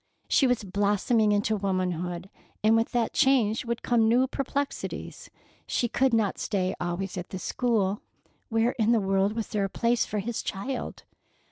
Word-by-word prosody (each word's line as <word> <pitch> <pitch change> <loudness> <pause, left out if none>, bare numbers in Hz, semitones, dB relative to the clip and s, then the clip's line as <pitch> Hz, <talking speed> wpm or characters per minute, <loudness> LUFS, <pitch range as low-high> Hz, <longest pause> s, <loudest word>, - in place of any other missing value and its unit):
She 270 - +4
was 245 -3 +1
blossoming 205 +3 +2
into 205 +1 +1
womanhood, 185 -2 -2 0.3
and 220 +1 +5
with 225 0 +1
that 235 -2 0
change 245 -5 +3
would 235 0 -3
come 230 -2 +3
new 250 +3 +4
perplexities. 275 +1 -4 0.4
She 240 - 0
could 265 +3 +2
not 220 -4 +1
stay 185 -3 -1
always 180 +2 -3
at 180 - -8
the 190 - -5
school. 210 -1 0 0.5
Where 225 +1 +2
in 225 +1 +4
the 230 - +4
world 195 +1 +1
was 225 -1 -4
there 205 -2 0
a - - -3
place 235 +3 +1
for 210 - -4
his 225 +3 -2
child? 250 +7 -4
215 Hz, 165 wpm, -27 LUFS, 195-235 Hz, 0.5 s, and